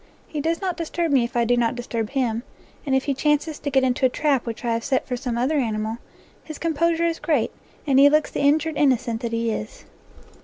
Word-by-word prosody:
He 300 Hz, -, -4 dB
does 330 Hz, +4 st, -1 dB
not 370 Hz, -3 st, -2 dB
disturb 335 Hz, 0 st, -2 dB
me 265 Hz, -4 st, +4 dB
if 240 Hz, +2 st, -5 dB
I 235 Hz, -, +3 dB
do 245 Hz, +1 st, +3 dB
not 240 Hz, 0 st, +1 dB
disturb 230 Hz, -3 st, -3 dB
him, 240 Hz, -5 st, -1 dB, 0.5 s
and 270 Hz, -, +2 dB
if 265 Hz, -, +2 dB
he 280 Hz, -, 0 dB
chances 295 Hz, +2 st, 0 dB
to 290 Hz, -, -3 dB
get 265 Hz, -1 st, +2 dB
into 255 Hz, 0 st, 0 dB
a 260 Hz, -, +6 dB
trap 275 Hz, -2 st, 0 dB
which 230 Hz, +1 st, -5 dB
I 235 Hz, -, +1 dB
have 230 Hz, 0 st, -2 dB
set 265 Hz, -2 st, 0 dB
for 250 Hz, -, -2 dB
some 245 Hz, -2 st, -3 dB
other 265 Hz, +6 st, +1 dB
animal, 220 Hz, -2 st, -2 dB, 0.4 s
his 310 Hz, -2 st, -8 dB
compo 335 Hz, +1 st, +1 dB
sure 335 Hz, +1 st, 0 dB
is 335 Hz, -1 st, -1 dB
great, 295 Hz, -9 st, +1 dB, 0.3 s
and 270 Hz, -3 st, +4 dB
he 285 Hz, +1 st, +8 dB
looks 305 Hz, +1 st, +2 dB
the -, -, -3 dB
injured 300 Hz, +2 st, +2 dB
innocent 245 Hz, -5 st, +1 dB
that 235 Hz, -2 st, -3 dB
he 230 Hz, 0 st, 0 dB
is. 215 Hz, 0 st, -6 dB
265 Hz, 240 wpm, -23 LUFS, 235-305 Hz, 0.5 s, he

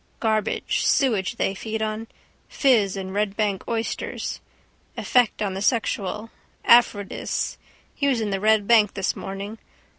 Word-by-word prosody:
Garbage, 220 Hz, -2 st, 0 dB
sewage 220 Hz, -9 st, +2 dB
they 195 Hz, -, 0 dB
feed 220 Hz, +3 st, -4 dB
on. 220 Hz, +1 st, -3 dB, 0.4 s
Fizz 215 Hz, -8 st, +2 dB
and 190 Hz, -1 st, -5 dB
Red 205 Hz, 0 st, -1 dB
bank 205 Hz, -3 st, 0 dB
oysters. 230 Hz, -1 st, -3 dB, 0.6 s
Effect 245 Hz, -4 st, +2 dB
on 195 Hz, -2 st, -1 dB
the 190 Hz, -, -4 dB
sexual. 215 Hz, -1 st, -1 dB, 0.3 s
Aphrodis. 225 Hz, -4 st, +2 dB, 0.3 s
He 280 Hz, -, -1 dB
was 260 Hz, -4 st, +2 dB
in 215 Hz, -2 st, -2 dB
the 195 Hz, -, -1 dB
Red 215 Hz, 0 st, +3 dB
Bank 220 Hz, -4 st, +5 dB
this 195 Hz, -1 st, -1 dB
morning. 200 Hz, +3 st, -6 dB
215 Hz, 140 wpm, -24 LUFS, 195-225 Hz, 0.6 s, Bank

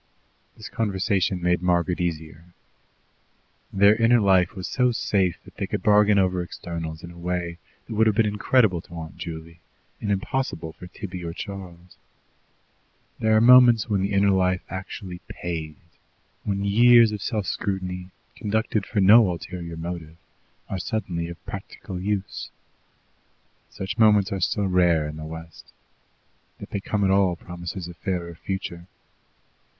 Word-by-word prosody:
This 110 Hz, -, -8 dB
conversation 95 Hz, -3 st, 0 dB
made 90 Hz, 0 st, +2 dB
Margaret 90 Hz, 0 st, +1 dB
easier. 80 Hz, 0 st, -5 dB, 1.2 s
Their 100 Hz, +2 st, +5 dB
inner 115 Hz, +2 st, +4 dB
life 95 Hz, -2 st, +3 dB
was 95 Hz, -2 st, -5 dB
so 125 Hz, -1 st, +2 dB
safe 95 Hz, -6 st, 0 dB
that -, -, -16 dB
they -, -, -2 dB
could -, -, -3 dB
bargain 105 Hz, 0 st, +5 dB
over 95 Hz, -2 st, +2 dB
externals 85 Hz, -2 st, -6 dB
in 85 Hz, -, -8 dB
a 85 Hz, -, -14 dB
way 85 Hz, -1 st, -3 dB, 0.3 s
that 115 Hz, -, -7 dB
would 110 Hz, +1 st, +3 dB
have 110 Hz, -, +2 dB
been 115 Hz, -, +3 dB
incredible 105 Hz, -2 st, +2 dB
to 85 Hz, -, -13 dB
Aunt 80 Hz, -1 st, -8 dB
Juley, 85 Hz, 0 st, -7 dB, 0.4 s
and 105 Hz, -, -3 dB
impossible 95 Hz, -, -2 dB
for 90 Hz, -, -11 dB
Tibby 90 Hz, 0 st, -7 dB
or 85 Hz, -1 st, -4 dB
Charles. 90 Hz, -3 st, -9 dB, 1.2 s
There 110 Hz, 0 st, +3 dB
are -, -, +4 dB
moments 120 Hz, -2 st, +7 dB
when 100 Hz, -3 st, +1 dB
the 100 Hz, +1 st, -1 dB
inner 100 Hz, 0 st, +3 dB
life 90 Hz, -1 st, +1 dB
actually 95 Hz, -1 st, -7 dB
"pays," 80 Hz, -3 st, -5 dB, 0.7 s
when 100 Hz, -1 st, -1 dB
years 115 Hz, +2 st, +6 dB
of 105 Hz, -2 st, -5 dB
self 105 Hz, -1 st, -2 dB
scrutiny, 90 Hz, -2 st, -3 dB, 0.3 s
conducted 110 Hz, -1 st, -1 dB
for 105 Hz, -, 0 dB
no 105 Hz, +2 st, +7 dB
ulterior 85 Hz, -1 st, -6 dB
motive, 80 Hz, -1 st, -6 dB, 0.5 s
are 95 Hz, -, -4 dB
suddenly 90 Hz, -4 st, -3 dB
of 85 Hz, 0 st, -10 dB
practical 90 Hz, -2 st, -7 dB
use. 100 Hz, 0 st, -3 dB, 1.2 s
Such 95 Hz, +3 st, -6 dB
moments 105 Hz, -3 st, +5 dB
are 95 Hz, -1 st, -2 dB
still 100 Hz, +3 st, +1 dB
rare 90 Hz, -4 st, +3 dB
in 75 Hz, +1 st, -7 dB
the 80 Hz, -, -7 dB
West; 80 Hz, -2 st, -10 dB, 0.9 s
that -, -, -10 dB
they 100 Hz, -, -2 dB
come 100 Hz, +1 st, -1 dB
at 95 Hz, -, +3 dB
all 95 Hz, -2 st, +3 dB
promises 90 Hz, +1 st, -7 dB
a 90 Hz, -, -8 dB
fairer 85 Hz, 0 st, -4 dB
future. 85 Hz, 0 st, -5 dB
95 Hz, 150 wpm, -24 LUFS, 85-105 Hz, 1.2 s, moments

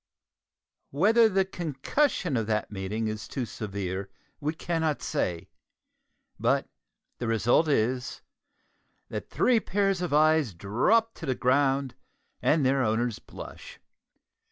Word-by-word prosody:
Whether 220 Hz, -, +4 dB
the 195 Hz, -1 st, +2 dB
concussion 175 Hz, -, -1 dB
of 115 Hz, -3 st, 0 dB
that 110 Hz, -1 st, -1 dB
meeting 105 Hz, +3 st, -3 dB
is 110 Hz, -1 st, -4 dB
too 130 Hz, -, -3 dB
severe, 100 Hz, -3 st, -4 dB, 0.3 s
we 150 Hz, +2 st, -2 dB
cannot 160 Hz, -2 st, -1 dB
say, 90 Hz, -, -2 dB, 0.9 s
but -, -, +1 dB, 0.5 s
the 120 Hz, -, -2 dB
result 115 Hz, +8 st, +3 dB
is, 125 Hz, -2 st, 0 dB, 0.9 s
that -, -, -5 dB
the -, -, -22 dB
three 245 Hz, -2 st, +4 dB
pair 200 Hz, -1 st, +1 dB
of 180 Hz, -4 st, -2 dB
eyes 155 Hz, -, +3 dB
drop 170 Hz, -, +2 dB
to -, -, -8 dB
the 130 Hz, -, +1 dB
ground, 135 Hz, +1 st, +2 dB, 0.5 s
and 155 Hz, -3 st, +3 dB
their 135 Hz, +1 st, +3 dB
owners 115 Hz, 0 st, 0 dB
blush. -, -, -11 dB
135 Hz, 125 wpm, -27 LUFS, 110-165 Hz, 0.9 s, Whether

